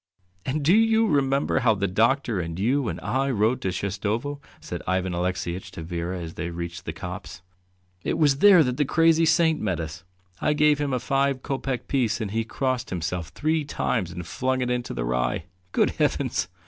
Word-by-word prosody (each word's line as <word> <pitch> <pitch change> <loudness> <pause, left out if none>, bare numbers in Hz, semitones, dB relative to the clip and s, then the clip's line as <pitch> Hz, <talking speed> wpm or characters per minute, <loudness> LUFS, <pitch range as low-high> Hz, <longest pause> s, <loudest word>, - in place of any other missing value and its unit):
"And 140 +2 -1
do 170 - +5
you 225 0 +4
remember 140 -6 +2
how 115 -4 +3
the 100 0 0
doctor 115 +3 +1
and 85 -1 -4
you 125 +6 +1
and - - -3
I 135 +2 0
rode 120 +1 +1
to 95 - -1
Shestovo?" 105 - -2 0.2
said - - -6
Ivan 95 0 0
Alexeyitch 90 0 -2
to 80 - -7
Vera 85 +2 -3
as 85 -1 -6
they 85 - -4
reached 85 0 -6
the - - -3
copse. 90 -1 -8 0.6
"It - - -1
was 145 -4 +3
there 195 -4 +8
that 125 -2 -2
the 145 - +2
crazy 165 +2 +4
saint 160 -2 +3
met 95 -6 -1
us: 80 0 -6 0.4
I 150 - +2
gave 150 0 +3
him 145 -1 -1
a 125 - 0
five 135 +1 0
kopeck 135 -3 -3
piece, 120 -5 +1
and 105 -4 -3
he 115 +1 0
crossed 130 +2 -2
himself 85 -1 -3
three 155 - 0
times 115 - -1
and 90 -1 -7
flung 130 +8 -1
it 125 0 0
into 120 - -2
the - - -2
rye. 60 0 0 0.3
Good - - +2
heavens! - - 0
120 Hz, 195 wpm, -25 LUFS, 90-140 Hz, 0.6 s, there